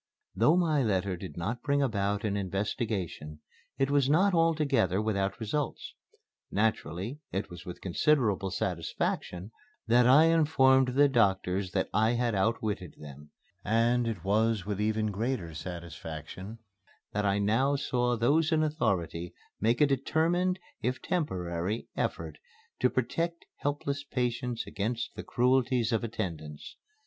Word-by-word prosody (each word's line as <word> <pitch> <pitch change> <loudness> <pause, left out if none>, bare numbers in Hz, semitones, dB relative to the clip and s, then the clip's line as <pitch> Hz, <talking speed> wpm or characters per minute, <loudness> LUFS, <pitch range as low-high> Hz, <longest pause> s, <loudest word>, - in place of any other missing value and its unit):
Though 160 +4 +4
my 160 -5 +2
letter 100 -5 0
did 90 +1 -9
not 110 +8 -3
bring 140 0 +1
about 100 -4 0
an 105 -2 0
investigation, 95 -5 -3 0.4
it 135 +1 +1
was 140 -2 +3
not 185 +6 +4
altogether 155 - +2
without 100 -2 -1
results. 135 +7 -3 0.6
Naturally, 110 - -1
it 95 +1 -3
was 90 0 -10
with 90 - -7
considerable 105 - +1
satisfaction 90 0 -3 0.3
that 120 +1 +4
I 135 +5 +7
informed 135 -6 +4
the 145 +1 +6
doctors 95 -6 +1
that - - +1
I 110 +3 +3
had 120 -1 0
outwitted 105 -3 -1
them, 75 0 -11 0.3
and 115 +2 +2
it 115 - -4
was 105 0 +1
with 105 0 -2
even 110 0 0
greater 105 -5 -2
satisfaction 85 +3 -7 0.5
that 105 - -1
I 100 0 +2
now 115 +8 +2
saw 125 -3 0
those 150 +8 +2
in 155 -1 +3
authority 100 - -1 0.2
make 115 +5 +2
a - - +8
determined, 165 +7 +1 0.2
if 125 +2 -1
temporary, 95 - -2
effort - - -3 0.4
to - - +3
protect 170 0 -2
helpless 145 0 -2
patients 125 -3 -2
against 115 +4 -3
the - - -5
cruelties 125 -1 +2
of 115 -1 0
attendants. 85 -10 -5
115 Hz, 135 wpm, -29 LUFS, 95-135 Hz, 0.6 s, a